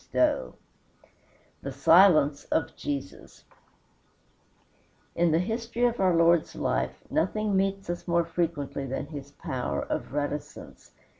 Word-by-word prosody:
XVIII 60 - +1 1.1
THE 140 - -5
SILENCE 155 0 +5
OF 160 - -1
JESUS 140 -10 -6 1.7
In 170 -1 +2
the 160 - +3
history 230 +6 -1
of 240 -1 0
our 185 -3 +3
Lord's 165 0 +3
life - - -2
nothing 210 +3 0
meets 195 0 0
us 175 +1 -5
more 170 -1 +2
frequently 165 -5 -2
than 135 +2 -3
his 145 -2 -8
power 130 -3 -4
of - - -4
reticence. 145 +1 -5
165 Hz, 120 wpm, -27 LUFS, 145-190 Hz, 1.7 s, SILENCE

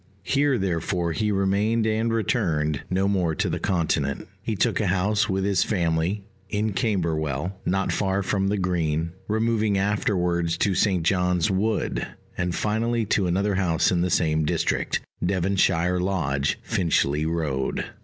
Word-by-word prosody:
Here 140 +3 +2
therefore 85 -2 -1
he 105 +5 0
remained 100 +3 +1
and 110 +1 +1
returned, 85 - 0
no 95 +1 +1
more 90 -5 +1
to - - 0
the - - -2
Continent. 80 -7 -1
He 110 +2 -2
took - - +1
a 105 - 0
house, 105 +4 +1
with 95 0 0
his 100 -2 +2
family, 85 +1 0 0.3
in 105 0 -1
Camberwell, 85 - -1
not 95 +2 +1
far 95 0 0
from 95 0 0
the 105 +1 0
Green; 85 -3 0 0.2
removing 110 -1 +1
afterwards 90 -4 0
to 100 - +1
St. 95 -3 +2
John's 90 +1 +2
Wood, 105 +3 0 0.3
and 90 -1 -2
finally 115 +2 0
to 95 -3 +2
another 100 +4 +1
house 90 -4 +2
in 90 -2 +1
the 90 - +1
same 80 -3 +2
district, 75 - 0 0.2
Devonshire 90 -1 +1
Lodge, 75 -7 0
Finchley 80 -3 +1
Road. 75 -5 -1
95 Hz, 145 wpm, -24 LUFS, 85-105 Hz, 0.3 s, Here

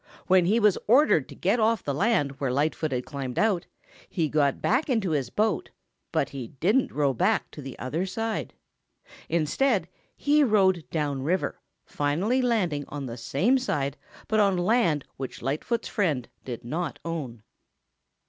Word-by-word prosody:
When 185 -1 +4
he 220 +5 +3
was 210 -4 +4
ordered 240 - +4
to - - -10
get 200 +7 +1
off 220 -1 +2
the 140 - -2
land 145 - +1
where 135 -3 0
Lightfoot 150 +3 0
had 125 -1 -2
climbed 135 -4 -5
out, 205 -5 +1 0.4
he 165 -5 0
got 145 -2 +2
back 260 +7 +1
into 220 -9 +1
his 140 -4 0
boat, 215 -4 0 0.4
but - - 0
he 130 -4 -6
didn't 220 +9 +2
row 140 -2 +1
back 115 - +1
to 150 - -9
the 135 -2 -8
other 160 +9 -2
side. 225 +3 -3 0.7
Instead, 170 - +1 0.3
he 295 +1 +3
rowed 190 - +3
down 145 -3 -1
the 130 - -5
river, 180 +5 -1 0.2
finally 175 - 0
landing 185 - 0
on 145 -2 -5
the 115 -2 -5
same 150 - +1
side 140 - -1 0.3
but 220 - +2
on 200 -3 +3
land 175 - +2
which 130 -3 -6
Lightfoot's 155 - -1
friend 155 - 0 0.2
did 120 -2 -7
not 155 +1 -3
own. 135 -10 -5
165 Hz, 165 wpm, -26 LUFS, 140-215 Hz, 0.7 s, When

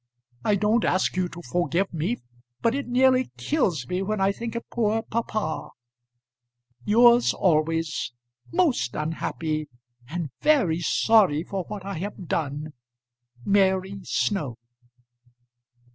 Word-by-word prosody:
I 210 - +3
don't 215 +3 +2
ask 185 - +1
you 185 -1 0
to 175 +1 -10
forgive 175 +2 0
me, 170 +9 -1 0.5
but 230 - +3
it 280 -1 -3
nearly 255 +1 +3
kills 180 - 0
me 180 +5 -1
when 210 +2 -1
I 195 +1 +3
think 230 +3 -6
of 235 - -5
poor 225 -1 +1
papa. 215 -7 -3 1.1
Yours 235 - +5
always, 165 -4 +1 0.4
most 290 - +1
unhappy, 155 -1 -3 0.4
and 165 -3 -4
very 225 - +3
sorry 180 -4 +3
for 190 -1 -4
what 205 -2 -7
I 195 -4 -4
have 195 0 -6
done, 150 0 -2 0.7
MARY 195 -1 +2
SNOW. 155 - -1
195 Hz, 120 wpm, -25 LUFS, 165-225 Hz, 1.1 s, Yours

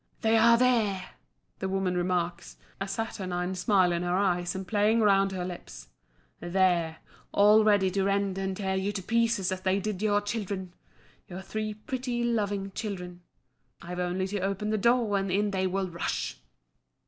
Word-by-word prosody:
"They 225 0 +3
are 235 +1 +6
there!" 220 -7 +1 0.5
the 190 - -2
woman 190 -1 0
remarks, 175 -1 -2 0.2
a 195 - -3
saturnine 190 -4 -3
smile 185 -2 +3
in 170 0 -1
her 175 +1 0
eyes 180 -3 0
and 190 -1 -5
playing 215 +3 +2
round 195 -2 +4
her 185 -2 -3
lips. 175 - -9 0.5
"There 175 -2 +1 0.3
all 210 +2 +6
ready 205 -3 +3
to 195 +1 0
rend 200 -1 +1
and 190 -1 -2
tear 190 -2 -1
you 190 +2 -1
to 195 -2 -4
pieces 230 -3 +1
as 185 0 -3
they 190 +1 +1
did 205 -1 -3
your 205 -1 +3
children 200 -4 -4 0.5
your 185 +1 -8
three 215 +2 -4
pretty, 245 +2 -3
loving 205 -4 -1
children. 180 -4 -6 0.6
I've 180 +1 -7
only 180 +1 -1
to 205 +1 -2
open 195 +2 -2
the 215 - +1
door, 230 -2 +3
and 195 0 -2
in 205 +2 +1
they 190 -1 0
will 190 +1 -1
rush!" 170 - -3
195 Hz, 170 wpm, -28 LUFS, 185-210 Hz, 0.6 s, are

